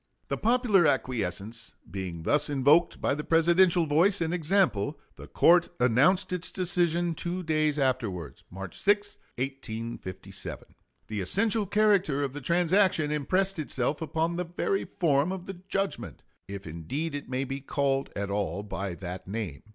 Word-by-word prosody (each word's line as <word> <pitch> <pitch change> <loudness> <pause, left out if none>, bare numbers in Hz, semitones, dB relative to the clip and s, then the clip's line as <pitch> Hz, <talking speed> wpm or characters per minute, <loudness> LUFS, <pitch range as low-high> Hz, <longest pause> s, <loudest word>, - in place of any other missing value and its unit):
The - - -1
popular 225 -7 +3
acquiescence 115 -5 -2 0.2
being 90 -4 -5
thus 150 - +1
invoked 145 +4 +3
by - - +1
the 150 +1 -3
Presidential 170 +2 +4
voice 170 +7 +3
and 165 0 -1
example, 155 - +1 0.2
the - - -11
court 175 0 +4
announced 140 - +3
its 180 -1 -2
decision 175 -2 0
two 175 +3 -4
days 155 -2 +1
afterwards 120 - -2
March 95 -1 -8
6, 205 0 +1 0.2
1857. 115 -7 -6 0.4
The 105 -2 -4
essential 205 - +1
character 200 -8 +2
of 135 -2 -3
the 145 - -6
transaction 175 0 +2
impressed 185 +6 0
itself 140 0 -1
upon 165 +2 -1
the 180 - -1
very 175 +3 -1
form 150 0 +1
of 190 -2 -5
the 195 - -6 0.2
judgment, 195 0 -3 0.2
if 100 0 -7
indeed 125 - -4
it 145 -2 -6
may 130 +1 -1
be 135 +1 -5
called 135 -1 0
at 100 0 -3
all 100 0 -2
by 100 -3 -4
that 90 +1 -7
name. 100 -8 -4
150 Hz, 150 wpm, -28 LUFS, 120-180 Hz, 0.4 s, Presidential